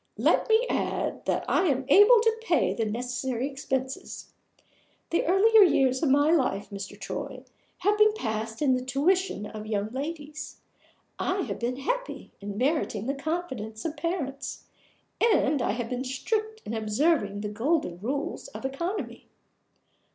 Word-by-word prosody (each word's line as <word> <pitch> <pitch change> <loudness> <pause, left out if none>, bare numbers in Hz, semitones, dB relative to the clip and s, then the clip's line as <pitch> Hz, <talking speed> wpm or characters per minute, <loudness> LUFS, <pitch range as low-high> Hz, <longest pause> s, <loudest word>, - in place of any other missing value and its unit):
Let - - +2
me 445 +2 +4
add - - -2
that - - 0
I 370 - +2
am 270 -3 +1
able 415 - +7
to 450 0 +2
pay 345 - +2
the 225 - -1
necessary 245 +3 -2
expenses. 265 -1 -4 0.8
The 335 - +2
earlier 425 +5 +6
years 265 -8 +4
of 310 - +2
my 290 +3 +4
life, 250 -12 +1
Mr. 200 -1 -7
Troy, - - -5 0.3
have 415 +3 +1
been 425 0 +6
passed 220 - -3
in 265 -3 +4
the 255 0 0
tuition 290 - +1
of 215 0 -8
young 210 0 -1
ladies. 300 +3 -6 0.6
I 380 +1 0
have - - -4
been 240 +2 -1
happy - - -3
in 200 0 -6
meriting 255 -5 0
the 275 - 0
confidence 275 -8 -4
of 320 -1 -2
parents; 295 -4 -4 0.6
and 305 - +3
I - - +1
have 235 0 -4
been 250 +1 -2
strict 435 - -2
in 220 - -4
observing 215 -1 +1
the 210 - -3
golden 225 - 0
rules 275 - -3
of - - -9
economy. 340 +10 -4
275 Hz, 150 wpm, -27 LUFS, 230-350 Hz, 0.8 s, able